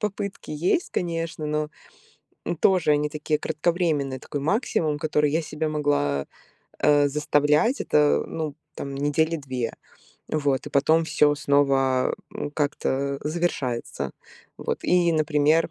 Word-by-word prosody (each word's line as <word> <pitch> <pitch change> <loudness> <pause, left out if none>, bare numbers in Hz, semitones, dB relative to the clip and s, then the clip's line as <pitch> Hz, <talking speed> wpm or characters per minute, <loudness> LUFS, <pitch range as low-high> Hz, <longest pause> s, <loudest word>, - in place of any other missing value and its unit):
попытки 200 -1 -4
есть, 175 - 0
конечно, 165 -3 -3
но, 150 0 -1 0.8
м, 170 - -1
тоже 180 -2 +3
они 150 0 +1
такие 150 0 -1
кратковременные, 155 -4 0
такой 145 - -5
максимум, 155 - 0
который 150 -1 +1
я 160 +3 +1
себя 155 +1 -3
могла, 145 - 0 0.5
э, 145 -1 +4
заставлять, 150 - +2
это, 150 -1 +3
ну 155 -3 -4 0.2
там, 140 0 -6
недели 145 +4 +1
2. 130 -6 -4 0.5
Вот. 140 -3 0
И - - -6
потом 160 +4 +3
всё 150 -2 +3
снова, 135 -3 +2 0.2
м, 145 - -4
как-то 140 -2 -1
завершается. 140 - -2 0.5
Вот. - - -3
И, 175 -1 +3
например, 155 +1 +2
150 Hz, 125 wpm, -25 LUFS, 140-160 Hz, 0.8 s, э